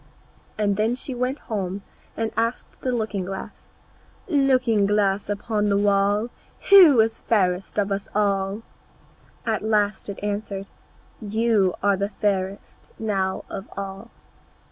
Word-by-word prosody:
And 205 -2 +1
when 220 +4 +1
she 260 +1 -5
went 250 +3 -1
home 195 -5 -4 0.3
and 225 -1 -1
asked 230 +2 -2
the 255 - -1
looking 215 -5 -2
glass, 190 +1 -7 0.6
"Looking 255 - +3
glass 205 -1 +1
against 210 0 -1
the 200 - +3
wall, 205 +2 +2 0.4
Who 345 - +9
is 225 0 -1
fairest 185 -4 0
of 200 -1 +1
us 195 0 -2
all?" 200 0 0 0.8
at 220 -3 0
last 210 -2 0
it 200 - -6
answered, 200 -1 -4 0.5
"You 215 -3 +1
are 200 -1 +3
the 200 +1 -1
fairest 195 -1 -3
now 195 -4 -1
of 195 0 -7
all." 195 +3 -6
205 Hz, 130 wpm, -24 LUFS, 195-225 Hz, 0.8 s, Who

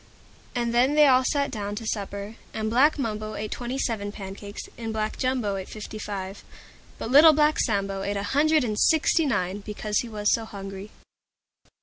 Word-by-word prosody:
And 235 -1 0
then 255 +5 +3
they 300 0 +7
all 260 -2 +5
sat 280 +1 0
down 205 -3 -4
to 225 +2 -6
supper. 200 0 -4 0.2
And 220 0 -2
Black 280 +7 +4
Mumbo 215 -4 -3
ate 215 0 -5
Twenty 245 +2 -4
seven 215 -6 -2
pancakes, 200 0 -8
and 225 -1 -5
Black 215 0 -2
Jumbo 250 -7 -1
ate 190 - -7
Fifty 215 0 -8
five 195 -1 -6 0.5
but 225 - -5
Little 310 +4 +9
Black 300 +1 +3
Sambo 195 -3 0
ate 200 +1 -2
a 200 - -2
Hundred 305 +6 +3
and 215 -3 -2
Sixty 320 0 +3
nine, 195 -5 -1
because 210 0 -2
he 240 - -4
was 210 -1 +1
so 230 - 0
hungry. 195 -1 -8
215 Hz, 185 wpm, -25 LUFS, 205-255 Hz, 0.5 s, Little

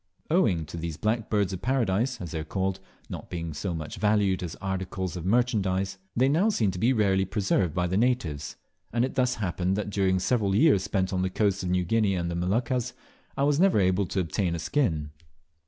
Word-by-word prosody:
Owing 100 - +2
to 75 +3 -8
these 80 -2 -4
"Black 110 +1 -1
Birds 100 -3 +1
of 90 - -5
Paradise," 120 -1 0
as 85 -6 -6
they 80 - -3
are - - -3
called, 95 +3 -2 0.3
not - - -8
being 85 -2 -4
so 85 +4 -3
much 80 -1 -6
valued 100 -2 +2
as 85 -3 -5
articles 95 -1 -3
of 90 0 -5
merchandise, 100 -5 +1 0.2
they 130 +3 +3
now 165 +10 +3
seem 110 - +1
to 90 - -6
be 115 +7 +3
rarely 100 -5 +2
preserved 95 -4 0
by 90 - +1
the 90 +2 0
natives, 90 - 0 0.4
and 120 +2 +2
it 130 - -5
thus 125 -1 +1
happened 95 -2 -1
that 105 0 -3
during 95 -2 +2
several 100 0 +1
years 120 - +5
spent 95 0 -1
on 90 - 0
the 95 - 0
coasts 100 0 0
of 90 - -3
New 90 0 +1
Guinea 105 0 +2
and 85 -1 -2
in 85 - -2
the 90 - -1
Moluccas 125 +4 0 0.4
I 140 - +1
was 145 +1 +2
never 190 - +4
able 95 0 +2
to 95 - -2
obtain 90 0 -1
a - - -2
skin. 85 - 0
95 Hz, 220 wpm, -27 LUFS, 90-115 Hz, 0.4 s, years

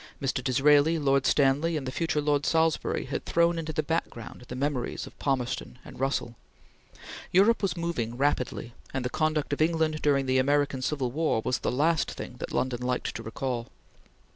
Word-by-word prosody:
Mr. 135 -2 -1
Disraeli, 145 +4 +4
Lord 140 -3 +2
Stanley, 145 +4 +3
and 140 - -4
the 130 - -3
future 160 0 0
Lord 145 -1 +1
Salisbury 160 0 +1
had - - -4
thrown 170 0 +2
into 160 -1 -4
the 155 0 -1
background 145 -7 -4
the 125 - -6
memories 135 -2 -2
of - - -14
Palmerston 125 -3 -2
and - - -11
Russell. 130 -3 -1 1.0
Europe 205 +6 +4
was 185 -3 -1
moving 125 -9 -2
rapidly, 125 -4 -1 0.2
and 130 -1 -1
the 125 - -2
conduct 155 -2 0
of 145 - -2
England 160 -1 +1
during 140 -2 +2
the 130 0 +2
American 140 0 +1
Civil 130 -2 -1
War 150 -6 0
was 125 - 0
the - - -1
last 155 +5 +2
thing - - -7
that - - -5
London 125 -2 -1
liked 125 0 -1
to - - -4
recall. 120 +1 -3
145 Hz, 180 wpm, -28 LUFS, 130-155 Hz, 1.0 s, Disraeli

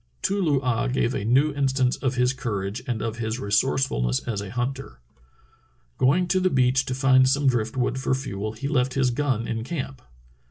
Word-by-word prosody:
Too 200 +1 +1
loo 150 -6 +2
ah 120 -1 0
gave 130 -1 0
a 100 - -3
new 135 +7 +3
instance 135 -2 +1
of 130 -1 -1
his 125 +1 +2
courage 105 -6 -4
and 120 -3 -2
of 115 0 -4
his 110 +1 -2
resourcefulness 100 - +1
as 105 -4 -3
a 100 - -7
hunter. 125 - -4 1.0
Going 165 +8 +3
to 185 - +3
the 185 0 +2
beach 130 -2 +2
to 130 - -3
find 130 -1 +4
some 140 +2 +1
drift 120 -1 0
wood 130 +1 0
for 130 0 0
fuel 110 -5 -4
he 115 +6 -5
left 130 -3 0
his 130 -2 +2
gun 120 -3 -1
in 115 -1 -3
camp. 135 -2 -5
130 Hz, 195 wpm, -24 LUFS, 115-135 Hz, 1.0 s, find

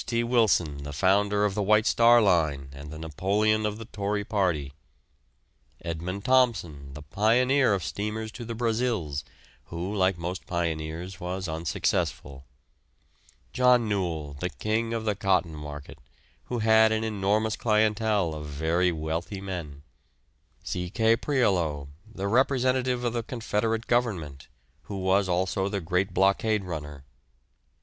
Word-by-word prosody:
T. 120 -1 -1
Wilson, 105 - +2
the 75 +1 -7
founder 100 +6 +2
of 100 - 0
the 105 - -1
White 105 +2 +3
Star 120 0 +5
Line 80 -8 +1
and 70 +2 -9
the 80 - -8
Napoleon 100 +8 0
of 105 0 -4
the 115 - -8
Tory 105 -1 -2
party; 85 -10 -1 1.1
Edmund 90 +4 -4
Thomson, 90 - +1
the 75 - -9
pioneer 120 - +3
of 95 - -4
steamers 105 +4 -4
to 120 - -8
the 115 0 -5
Brazils, 110 - -1 0.4
who, 90 +5 -5
like 95 -2 +2
most 90 +3 -5
pioneers, 85 +1 -3
was 90 +1 -4
unsuccessful; 80 -3 -2 1.1
John 125 -2 +4
Newall, 85 -8 -2
the 90 - -2
"king" 110 +5 -2
of 115 -1 -3
the 105 - +1
cotton 95 -4 +1
market, 75 -1 -9 0.5
who 125 - -3
had 110 0 +5
an 110 0 0
enormous 105 0 0
clientele 105 -4 +1
of 75 -1 -6
very 80 +5 +1
wealthy 80 +4 -4
men; 85 -7 -6 0.8
C. 90 -1 -3
K. 110 +3 +3
Prioleau, 90 - 0 0.2
the 100 -2 -4
representative 130 +1 +1
of 120 -1 -1
the 120 - -1
Confederate 115 -1 -2
Government, 90 - -1 0.4
who 100 - -6
was 95 +1 +2
also 95 +2 0
the 100 -1 -2
great 90 +3 -1
blockade 100 +3 +2
runner. 75 -5 -7
100 Hz, 140 wpm, -27 LUFS, 80-110 Hz, 1.1 s, Star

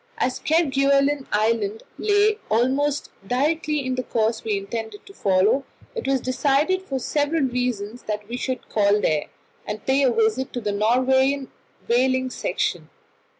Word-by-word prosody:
As 255 - -1
Kerguelen 280 -2 +2
Island 215 0 0 0.2
lay 420 +1 +3
almost 270 +6 +1 0.2
directly 300 +3 0
in 255 - -1
the 255 - -1
course 225 -2 -1
we 215 -2 0
intended 215 +1 -6
to 395 - -14
follow, 200 - +2 0.3
it 465 - -5
was 270 -1 +2
decided 285 +8 +1
for 280 -8 -4
several 290 +4 0
reasons 245 -3 -2
that 210 -1 -3
we 235 - -5
should 255 -1 -4
call 205 -1 +2
there, 155 -6 +1 0.4
and 210 0 -5
pay 265 +1 +3
a 260 -3 +4
visit 225 +3 0
to 245 - -2
the 210 -3 -2
Norwegian 260 +5 +2 0.4
whaling 260 +1 +2
station. - - -2
255 Hz, 150 wpm, -23 LUFS, 220-280 Hz, 0.4 s, a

